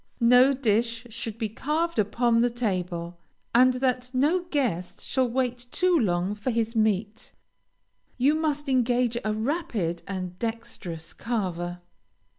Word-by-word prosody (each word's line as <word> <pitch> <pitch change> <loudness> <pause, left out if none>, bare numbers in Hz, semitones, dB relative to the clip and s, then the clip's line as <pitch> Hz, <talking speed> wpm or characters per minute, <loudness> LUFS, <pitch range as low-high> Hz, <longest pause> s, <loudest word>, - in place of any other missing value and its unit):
No 250 +3 +6
dish 230 -1 0
should 225 -1 -5
be 225 -2 -1
carved 305 +8 -1
upon 230 +3 +2
the 245 - +3
table, 180 -7 -3 0.3
and 255 +2 +6
that 250 -1 0
no 320 +8 +2
guest 225 - -1
shall 260 -2 +1
wait 245 0 -1
too 365 +6 +2
long 185 - +1
for 210 +5 -3
his 230 -1 -1
meat, 215 0 0 0.9
you 270 +4 +4
must 305 -2 -1
engage 245 -2 +2
a 215 - 0
rapid 220 - -2
and 185 -2 -5
dexterous 225 -8 -5
carver. 180 -6 -3
235 Hz, 130 wpm, -26 LUFS, 205-255 Hz, 0.9 s, No